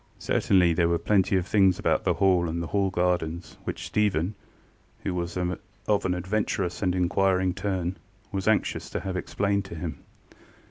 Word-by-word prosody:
Certainly 90 Hz, -3 st, +3 dB
there 85 Hz, 0 st, +2 dB
were 85 Hz, -, +2 dB
plenty 95 Hz, +1 st, +2 dB
of 90 Hz, -, -1 dB
things 95 Hz, -2 st, +4 dB
about -, -, +1 dB
the -, -, +2 dB
Hall 90 Hz, -3 st, +3 dB
and 85 Hz, +1 st, -2 dB
the 85 Hz, -, -2 dB
Hall 100 Hz, -1 st, +2 dB
gardens 90 Hz, -2 st, -1 dB
which -, -, -4 dB
Stephen, 100 Hz, -3 st, +1 dB, 0.7 s
who 95 Hz, -, -1 dB
was 85 Hz, 0 st, -3 dB
of 95 Hz, +3 st, -2 dB
an 90 Hz, -, +1 dB
adventurous 95 Hz, -1 st, -1 dB
and 90 Hz, -2 st, +1 dB
inquiring 95 Hz, 0 st, +2 dB
turn, 95 Hz, -2 st, -2 dB, 0.3 s
was 95 Hz, 0 st, -3 dB
anxious 110 Hz, -1 st, +1 dB
to -, -, -3 dB
have 95 Hz, -1 st, -4 dB
explained 100 Hz, +2 st, 0 dB
to 90 Hz, -, -8 dB
him. 80 Hz, 0 st, -5 dB
95 Hz, 170 wpm, -26 LUFS, 90-100 Hz, 0.7 s, things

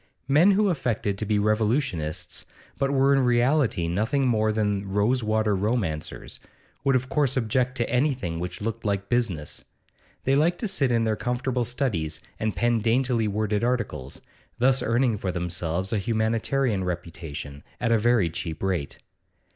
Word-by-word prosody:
Men 160 Hz, +9 st, +5 dB
who 205 Hz, +1 st, +3 dB
affected 110 Hz, -, -1 dB
to 110 Hz, -, -3 dB
be 105 Hz, -1 st, +2 dB
revolutionists, 100 Hz, -, -1 dB, 0.3 s
but 135 Hz, -, +1 dB
were 135 Hz, 0 st, +3 dB
in 135 Hz, -, +4 dB
reality 125 Hz, -, +2 dB
nothing 110 Hz, +10 st, 0 dB
more 110 Hz, -2 st, +2 dB
than 105 Hz, -2 st, -1 dB
rose 105 Hz, +6 st, +1 dB
water 110 Hz, -1 st, +1 dB
romancers, 95 Hz, -7 st, -2 dB, 0.4 s
would 135 Hz, -1 st, +3 dB
of 130 Hz, 0 st, +1 dB
course 135 Hz, -1 st, +1 dB
object 125 Hz, +2 st, 0 dB
to 120 Hz, -, 0 dB
anything 125 Hz, -, 0 dB
which 85 Hz, +1 st, -5 dB
looked 115 Hz, +1 st, -3 dB
like 100 Hz, -2 st, -1 dB
business; 100 Hz, -12 st, -1 dB, 0.6 s
they 135 Hz, -, +2 dB
liked 165 Hz, +5 st, +3 dB
to 225 Hz, -, 0 dB
sit 145 Hz, -10 st, +1 dB
in 115 Hz, -1 st, +2 dB
their 110 Hz, -1 st, +1 dB
comfortable 125 Hz, +1 st, -1 dB
studies 100 Hz, -, -2 dB, 0.2 s
and 110 Hz, -1 st, -1 dB
pen 120 Hz, -1 st, +2 dB
daintily 115 Hz, 0 st, +1 dB
worded 105 Hz, +1 st, -1 dB
articles, 115 Hz, -, -2 dB, 0.3 s
thus 130 Hz, +2 st, +3 dB
earning 115 Hz, -2 st, +1 dB
for 95 Hz, -, -2 dB
themselves 90 Hz, +2 st, -2 dB
a 110 Hz, -, +2 dB
humanitarian 110 Hz, +1 st, 0 dB
reputation 80 Hz, -5 st, -6 dB, 0.2 s
at 120 Hz, -1 st, 0 dB
a 115 Hz, -, +4 dB
very 115 Hz, -4 st, +3 dB
cheap 80 Hz, 0 st, -5 dB
rate. 90 Hz, -7 st, -2 dB
110 Hz, 155 wpm, -25 LUFS, 95-125 Hz, 0.6 s, Men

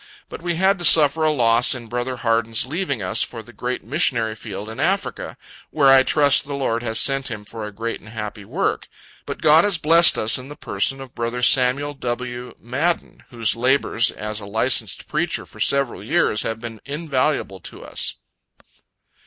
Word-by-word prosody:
But -, -, -9 dB
we 175 Hz, 0 st, -2 dB
had 190 Hz, +3 st, +2 dB
to -, -, -6 dB
suffer 160 Hz, -1 st, +6 dB
a 155 Hz, -, +3 dB
loss 120 Hz, -3 st, +3 dB
in 120 Hz, -2 st, -8 dB
brother 120 Hz, +2 st, -4 dB
Harden's 115 Hz, -1 st, 0 dB
leaving 140 Hz, -, -3 dB
us 90 Hz, -, +1 dB
for 115 Hz, -2 st, -4 dB
the 120 Hz, +3 st, -16 dB
great 125 Hz, +1 st, -4 dB
missionary 115 Hz, -4 st, 0 dB
field 105 Hz, -2 st, -8 dB
in 110 Hz, -, -9 dB
Africa, 195 Hz, +2 st, -2 dB, 0.3 s
where 140 Hz, -3 st, +3 dB
I 135 Hz, 0 st, +7 dB
trust 145 Hz, +1 st, +3 dB
the 140 Hz, -, -4 dB
Lord 120 Hz, -4 st, -1 dB
has 110 Hz, -2 st, 0 dB
sent 135 Hz, -1 st, +2 dB
him 105 Hz, -2 st, -7 dB
for 110 Hz, 0 st, -7 dB
a -, -, -9 dB
great 115 Hz, +3 st, -5 dB
and 105 Hz, -, -15 dB
happy 105 Hz, -1 st, -7 dB
work. -, -, -2 dB, 0.4 s
But -, -, -7 dB
God 155 Hz, +2 st, +6 dB
has 205 Hz, -4 st, +2 dB
blessed 165 Hz, +2 st, +5 dB
us 110 Hz, +3 st, +4 dB
in 130 Hz, +2 st, -11 dB
the 145 Hz, -, -9 dB
person 135 Hz, -2 st, -3 dB
of 130 Hz, -2 st, -11 dB
brother 120 Hz, +1 st, -4 dB
Samuel 135 Hz, +3 st, +3 dB
W. 125 Hz, -1 st, -5 dB
Madden, 145 Hz, +9 st, -3 dB
whose 115 Hz, -3 st, -1 dB
labors 125 Hz, -1 st, +1 dB
as 105 Hz, 0 st, -6 dB
a 100 Hz, -, -9 dB
licensed 110 Hz, +5 st, +1 dB
preacher -, -, -2 dB
for -, -, -15 dB
several 140 Hz, -7 st, 0 dB
years 125 Hz, -4 st, +1 dB
have 115 Hz, 0 st, -3 dB
been 115 Hz, -2 st, -9 dB
invaluable 140 Hz, -, -2 dB
to -, -, -10 dB
us. -, -, -3 dB
125 Hz, 185 wpm, -21 LUFS, 115-145 Hz, 0.4 s, I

